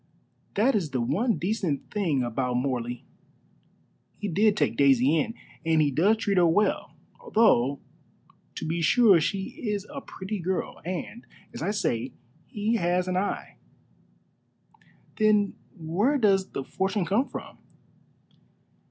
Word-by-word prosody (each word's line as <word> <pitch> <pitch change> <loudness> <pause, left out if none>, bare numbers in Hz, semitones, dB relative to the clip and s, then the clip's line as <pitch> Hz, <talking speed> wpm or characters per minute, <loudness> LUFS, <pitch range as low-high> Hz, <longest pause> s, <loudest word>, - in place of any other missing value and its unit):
That 235 +7 +3
is 185 -8 0
the 130 - -2
one 195 - +1
decent 180 -7 -2
thing 165 -11 0
about 125 +1 -2
Morley. 125 -2 -2 1.1
He 210 - -4
did 205 +3 +2
take - - +1
Daisy 140 +1 +4
in, 230 +9 -2 0.3
and 160 -1 +2
he 150 -2 +3
does 195 +11 +3
treat 200 -3 -1
her 175 - +5
well, 205 +6 +1 0.4
though 140 - +4 0.8
to - - -5
be 165 +2 -2
sure 200 0 +5
she 190 +4 -2
is 210 -4 -2
a 275 - -5
pretty 195 -2 -6
girl, 185 +2 -3
and, 185 +7 -6 0.3
as - - -7
I 175 - -1
say, 130 - -1 0.3
he 215 +3 -1
has 180 0 0
an 185 - -1
eye." 190 +2 -3 1.6
"Then 210 -2 +3 0.2
where 185 - +1
does 195 -5 +2
the 135 - -4
fortune 195 +4 -1
come 225 +10 +1
from?" - - -8
185 Hz, 135 wpm, -26 LUFS, 150-210 Hz, 1.6 s, her